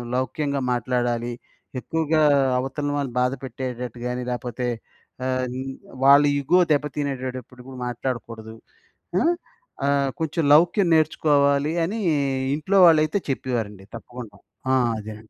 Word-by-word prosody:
లౌక్యంగా 140 +2 -1
మాట్లాడాలి. 120 -1 -1 0.5
ఎక్కువగా 160 +2 0 0.4
అవతల 135 +3 -3
వాళ్ళని 140 -4 -3
బాధ 125 0 +2
పెట్టేటట్టు 125 -2 -6
గాని, 125 0 -3
లేకపోతే 125 0 -3 0.6
ఆహ్, 130 0 0 0.6
వాళ్ళ 140 +1 +8 0.2
ఇగో 140 +6 +2
దెబ్బ 150 0 +2
తినేడప్పుడు 130 -3 -5
గూడ 135 - -9
మాట్లాడకూడదు. 115 -2 -5 0.7
అ! - - +1 0.7
ఆహ్, 140 -1 +2
కొంచెం 160 +1 -1
లౌక్యం 175 +5 +4
నేర్చుకోవాలి" 145 -2 +2
అనీ, 215 +6 -3 0.5
ఇంట్లో 170 +7 0
వాళ్ళైతే 155 +3 +3
చెప్పేవారండి 110 -7 -4
తప్పకుండ. 120 0 -9 0.4
ఆ! - - +5 0.2
అదేనండి. 110 +1 -10
130 Hz, 110 wpm, -23 LUFS, 120-150 Hz, 0.7 s, వాళ్ళ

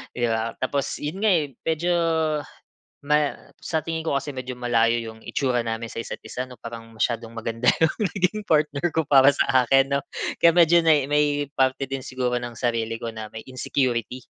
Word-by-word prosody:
'di 120 -1 +1
ba. 115 0 -1
Tapos 140 +1 -1
'yon 150 +6 -4
nga 215 - +5
eh, 150 -6 0
medyo 165 +2 +1 1.1
ma 150 0 +2 0.3
sa 160 - 0
tingin 160 -1 -3
ko 160 - -1
kasi 140 +2 -6
medyo 130 0 -5
malayo 120 -1 +2
'yong 110 -1 -8
itsura 125 -3 0
namin 115 0 -3
sa - - -6
isa't - - -7
isa 125 - -4
'no, 125 - -13
parang 115 0 -8
masyadong 115 0 -1
maganda 115 +1 -3
'yong 160 - +3 0.2
naging 195 +3 0
partner 150 0 +2
ko 160 - +1
para 140 0 +7
sa 130 -2 +2
akin 135 +2 +3
'no, 140 - 0 0.4
kaya 170 - +7
medyo 170 0 +6
nay 150 -4 +4
may 145 -1 +1
parte 130 +1 +1
din 135 0 -3
siguro 125 -1 -2
ng 120 -1 -7
sarili 115 -2 -1
ko 115 - -4
na 110 -1 -6
may 110 - -6
insecurity. 125 -2 -2
130 Hz, 190 wpm, -24 LUFS, 115-150 Hz, 1.1 s, para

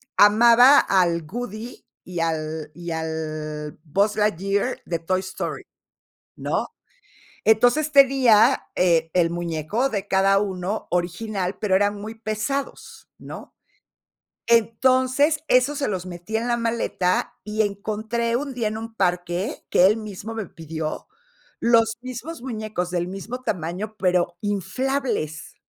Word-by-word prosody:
amaba 235 +6 +7
al 170 -4 +2
Woody 235 +2 -7 0.2
y 175 -2 -4
al 155 -1 -3
y 170 +2 -7
al 155 -2 -4
Buzz 200 +7 +1
Lightyear 205 +2 0
de 170 -1 -2
Toy 185 +3 0
Story, 185 0 -5 0.7
¿no? - - -1 0.8
Entonces, 245 +8 +3
tenía, 265 -4 +5
eh, 165 -3 +2
el 170 -2 +3
muñeco 175 - -1
de 205 -6 -3
cada 195 +1 +4
uno, 195 0 -3
original, 180 +2 -2
pero 190 -3 +2
eran 205 +1 +2
muy 215 +2 -7
pesados, 220 +6 -4
¿no? - - -10 0.9
Entonces, 260 +6 +3
esos 260 +2 +3
se 280 - -1
los 185 -3 -3
metía 185 +5 -4
en 235 - -3
la 240 -1 +1
maleta 230 -6 -1
y 215 +1 -1
encontré 215 +3 -2
un 280 +1 -4
día, 230 -3 -1
en 215 - -5
un 225 0 -8
parque, 180 0 -1
que 180 - +5
él 210 +4 +4
mismo 215 0 -7
me 220 -3 -5
pidió, 160 -2 -6 0.5
los 230 -1 +3
mismos 255 +5 -7
muñecos 215 -7 -4
del 175 -1 -1
mismo 205 +7 -6
tamaño, 185 +2 -3
pero 180 -2 +1
inflables. 205 - -2
205 Hz, 130 wpm, -23 LUFS, 175-235 Hz, 0.9 s, amaba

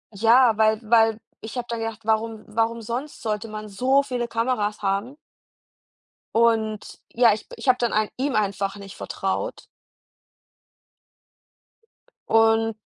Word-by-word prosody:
ja, 230 +3 +5
weil 220 0 +3
weil 225 0 +3 0.2
ich 220 +3 -7
habe 245 - -2
dann 235 -1 -3
gedacht: 225 -1 -5
„Warum 220 0 -1
warum 225 +2 -1
sonst 245 +7 -5
sollte 215 0 -2
man 215 0 -7
so 255 +7 +2
viele 250 -3 -3
Kameras 230 -3 -1
haben?“ 200 +7 -1 1.2
Und, 220 -2 +1
ja, 235 -1 +5
ich 215 - -6
ich - - -9
habe 255 -1 +5
dann 240 -1 0
ein 215 0 +1
ihm 265 -1 -1
einfach 200 -1 -1
nicht 200 -1 -10
vertraut. 195 - -4 2.6
Und 225 0 +3
225 Hz, 130 wpm, -24 LUFS, 215-235 Hz, 2.6 s, ja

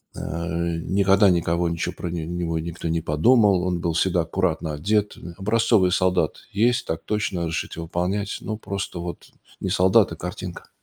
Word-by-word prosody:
Э, - - -7
а, 85 0 -2
никогда 95 +3 +3
никого 85 0 +1
ничего 85 +2 -2
про 90 - -4
него 85 0 -2
никто 85 +1 -5
не 80 0 0
подумал, 95 +5 +4
он 90 -1 -1
был 85 -1 0
всегда 85 +1 +2
аккуратно 80 -2 -1
одет, 105 +7 0
э. 85 - -9
Образцовый 105 -1 +3
солдат: 90 0 +1
"Есть, 120 +4 +2
так 80 - -4
точно, 105 -4 -1
разрешите 85 0 -3
выполнять". 90 +5 -2
Ну, 110 - -4
просто 100 -4 -5
вот 85 0 -7 0.3
не 95 - -2
солдат, 95 +2 +4
а - - -4
картинка. 90 +1 -7
90 Hz, 165 wpm, -23 LUFS, 85-100 Hz, 0.3 s, подумал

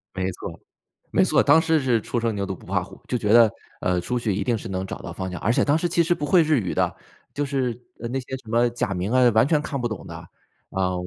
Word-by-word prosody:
没 95 0 -1
错， - - -8 0.5
没 - - +4
错， - - +3
当 155 +3 +6
时 160 -2 +2
是 125 -4 +2
初 120 - -2
生 115 -1 0
牛 100 -1 -2
犊 95 - -4
不 - - -16
怕 95 -1 0
虎， 95 - -14
就 125 - 0
觉 105 -1 +1
得， 115 -2 +7 0.3
呃， 90 -1 +1
出 125 +8 -2
去 110 -4 -1
一 100 +1 -1
定 120 +3 +1
是 100 - -7
能 95 0 -3
找 - - -7
到 90 - -7
方 95 +2 -4
向， 90 - -5
而 110 - +2
且 - - +2
当 145 +2 +3
时 175 +1 -1
其 170 0 +3
实 170 - +2
不 145 - -3
会 170 +2 +5
日 155 -4 +2
语 95 - -3
的， - - +1 0.4
就 145 - -1
是 130 -4 -2 0.2
呃 115 - -4
那 135 - -1
些 130 +1 -6
什 115 -4 -15
么 120 +1 +3
假 120 -4 -2
名 90 +4 -2
啊， 125 0 +5
完 110 +4 +4
全 150 -1 +3
看 140 -2 -4
不 120 - 0
懂 110 -4 -6
的， - - -8 0.6
啊。 95 -1 0
120 Hz, 305 characters per minute, -24 LUFS, 100-135 Hz, 0.6 s, 得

